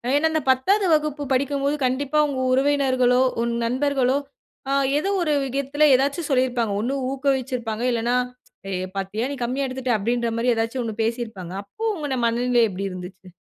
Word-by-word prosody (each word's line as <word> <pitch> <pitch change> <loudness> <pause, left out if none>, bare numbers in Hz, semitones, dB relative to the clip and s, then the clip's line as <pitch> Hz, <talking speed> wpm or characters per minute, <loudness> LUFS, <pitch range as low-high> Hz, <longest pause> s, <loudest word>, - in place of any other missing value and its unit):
ஏன்னா, 300 +3 +3
அந்த 315 - 0
10வது 385 +11 +3
வகுப்பு 300 -1 0
படிக்கும்போது 280 +2 0
கண்டிப்பா 275 +4 0
உங்க 275 -2 -3
உறவினர்களோ, 260 -2 +3 0.2
உங்க 235 0 -1
நண்பர்களோ, 265 +1 +1 0.5
அ - - 0 0.3
ஏதோ 385 - -2
ஒரு 310 -3 +1
விதத்துல 280 +3 +1
ஏதாவது 280 +5 0
சொல்லிருப்பாங்க. 250 -5 +1
ஒண்ணு 260 +4 -1 0.2
ஊக்குவிச்சிருப்பாங்க, 260 -4 -1
இல்லேன்னா 235 +1 0 0.5
"ஏ - - -4 0.3
பாத்தியா! 200 +5 -2
நீ - - -3
கம்மியா 265 +3 -1
எடுத்துட்ட" 255 -1 -2
அப்டீன்ற 235 +2 -1
மாரி 240 +1 +2
ஏதாவது 225 +3 -1
ஒண்ணு 220 -2 -4
பேசிருப்பாங்க. 220 -6 -4
அப்போ, 200 - -10
உங்க 290 -6 -3
மனநிலை 240 +1 +2
எப்டி 195 +1 -4
இருந்துச்சு? 185 0 -9
255 Hz, 150 wpm, -23 LUFS, 235-280 Hz, 0.5 s, ஏன்னா